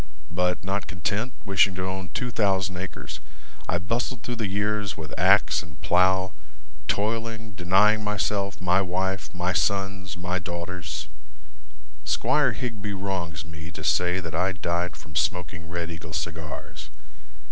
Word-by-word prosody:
But 90 +1 +1
not 95 0 -1
content, 100 - -1
Wishing 95 -1 +4
to 90 0 -2
own 95 -1 -3
two 125 +9 -2
thousand 95 -4 +2
acres, 90 +1 -5 0.5
I 85 - +3
bustled 115 +5 -1
through 120 -1 -3
the 110 -3 0
years 100 0 0
with 80 -4 -7
axe - - +5
and 75 -2 -13
plow, 95 +1 +4 0.6
Toiling, 110 +1 -1
denying 100 +4 +4
myself, 100 -1 0
my 90 +1 +4
wife, 95 +1 -1
my 90 +1 0
sons, 95 -1 0
my 90 +1 -1
daughters. 85 +1 -4 1.0
Squire - - +3
Higbee 110 -4 -3
wrongs 90 -6 -2
me 80 0 -8
to 85 -2 -8
say 90 +3 +3
That 85 -3 -5
I 90 +4 +2
died 85 0 -1
from 75 -1 -13
smoking 90 +2 0
Red 85 0 -2
Eagle 80 -1 -7
cigars. 80 -3 -5
95 Hz, 140 wpm, -26 LUFS, 85-100 Hz, 1.0 s, axe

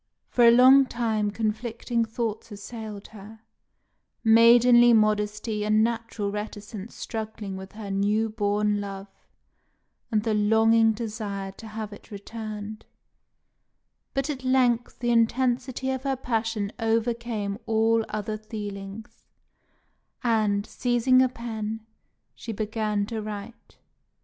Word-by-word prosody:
For 240 -1 +5
a - - +10
long 260 +3 +7
time 220 -4 -1
conflicting 230 +2 -2
thoughts 225 0 -4
assailed 210 0 -8
her, 215 +1 -12 0.8
maidenly 240 +1 +7
modesty 210 0 +1
and 215 +1 +3
natural 230 -3 -2
reticence 210 0 -7
struggling 220 -3 -5
with 190 0 -9
her 210 -2 -7
new 205 +3 +1
born 210 -1 0
love 195 0 -7 1.0
and 215 -2 +1
the 220 -1 0
longing 225 +2 +4
desire 210 -3 -5
to 220 +3 -12
have 215 -1 -6
it 205 - -14
returned; 215 0 -7 1.3
but 275 0 0
at 275 -4 -4
length 250 -2 +2
the 240 -1 0
intensity 250 +2 +1
of 260 -1 -3
her 270 0 -1
passion 225 -4 -2
overcame 225 -2 -1
all 225 0 +2
other 215 0 -3
feelings, 205 0 -8 1.0
and, 215 -4 +1
seizing 250 +2 +2
a 260 - +3
pen, 225 -2 -5 0.5
she 230 - -7
began 215 -1 -1
to 225 0 -4
write. 210 +2 -8
220 Hz, 115 wpm, -26 LUFS, 210-235 Hz, 1.3 s, a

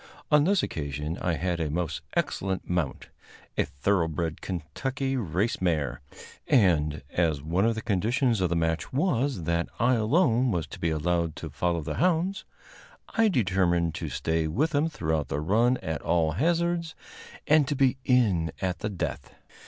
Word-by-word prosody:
On 150 0 +5
this 195 -1 +3
occasion 75 +1 -3
I 90 - 0
had 90 +1 -1
a 80 -2 -1
most 80 0 -2
excellent 95 -1 -1
mount, 85 -6 -2 0.5
a - - +1
thoroughbred 80 +1 -1
Kentucky 130 - -3
race 100 -2 -1
mare, 80 -5 0 0.5
and, 80 - +3
as 80 -5 0
one 85 +6 +1
of 115 0 +2
the 110 - -5
conditions 115 +2 +1
of 90 - +2
the 85 - 0
match 80 -2 -1
was 135 - 0
that 85 +1 0
I 125 +2 +4
alone 125 +1 +3
was 85 -8 -1
to - - -9
be 85 - 0
allowed 85 +1 0
to 80 -4 -7
follow 85 +3 0
the 75 0 -4
hounds, 180 +2 +1 0.6
I 225 0 +3
determined 95 - +1
to - - -4
stay 80 0 -1
with 140 - 0
them 150 +1 +1
throughout 80 - -1
the 70 - -2
run 115 +10 +2
at 80 0 -3
all 80 -2 +1
hazards, 170 - 0 0.5
and 150 -2 +4
to 145 - -1
be 135 -1 +3
in 100 -12 +2
at 90 -2 -2
the 105 - -2
death. 85 -9 -5
90 Hz, 165 wpm, -27 LUFS, 80-130 Hz, 0.6 s, On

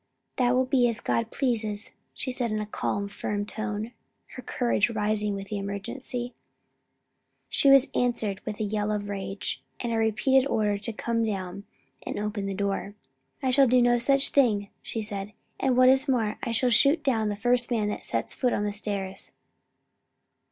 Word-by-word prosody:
"That 250 -1 +3
will 255 +1 +3
be 255 -2 +3
as 230 -1 -1
God 230 -1 -1
pleases," 225 -6 -1 0.2
she 260 - -2
said 250 -2 -1
in 215 - -1
a 210 - -2
calm, 205 -1 -2
firm 205 0 -3
tone, 215 +1 -4 0.4
her 255 - -7
courage 240 -3 +1
rising 210 -2 0
with 195 0 -7
the 210 - -2
emergency. 240 +5 -5 1.2
She 280 - +3
was 275 0 +7
answered 230 -5 0
with 210 -1 -5
a - - 0
yell 210 0 -1
of 205 -1 -2
rage, 195 -7 -4 0.2
and 235 - -2
a - - +1
repeated 255 +5 +3
order 210 -5 +1
to 230 - -3
come 230 +1 -1
down 195 -2 -3 0.4
and - - -5
open 205 -1 -2
the 195 - -3
door. 200 0 -2 0.5
"I 260 - +2
shall 270 +1 +5
do 250 +1 +5
no 240 0 +4
such 275 +3 +3
thing," 210 -8 +2
she 225 - -4
said; 205 -1 -5 0.3
"and 260 -2 +2
what 255 0 +7
is 265 +2 +5
more, 225 -5 +1
I - - -3
shall 240 +2 +1
shoot 285 +7 +4
down 225 -6 +1
the 205 - -2
first 245 +3 +2
man 220 -4 +1
that - - -4
sets - - -2
foot 250 -2 0
on 205 - 0
the 205 - -1
stairs." 200 -2 -3
220 Hz, 185 wpm, -27 LUFS, 205-245 Hz, 1.2 s, was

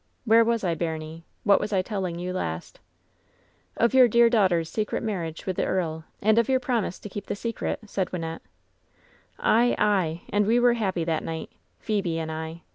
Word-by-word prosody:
Where 230 0 +6
was 230 -1 0
I, 175 -3 +1
baimie? 160 0 -4 0.2
What 200 -1 +5
was 215 - -3
I 190 -2 +2
telling 185 -4 -3
you 180 +1 -4
last 80 - -4 0.5
?" - - -36
"Of 235 +2 +2
your 260 -1 +7
dear 235 +1 +5
daughter's 185 -8 +3
secret 215 +6 -2
marriage 170 -7 -4
with 185 -2 -3
the - - +1
earl, 160 -4 -2 0.2
and 220 +2 +5
of 235 - +1
your 260 -1 +3
promise 240 -8 -1
to - - -9
keep 205 0 -7
the - - -2
secret,'' 225 0 -4
said 190 -2 -2
Wynnette. 165 -2 -5 1.0
"Ay, 240 +2 +3
ay! 185 -6 +1
And 205 0 +1
we 235 +2 +4
were 245 0 +5
happy 190 -7 -1
that 160 -1 -1
night 160 0 -5 0.3
Phebe 195 -6 -1
and 160 -1 -3
I. 160 +1 -6
190 Hz, 195 wpm, -26 LUFS, 165-225 Hz, 1.0 s, your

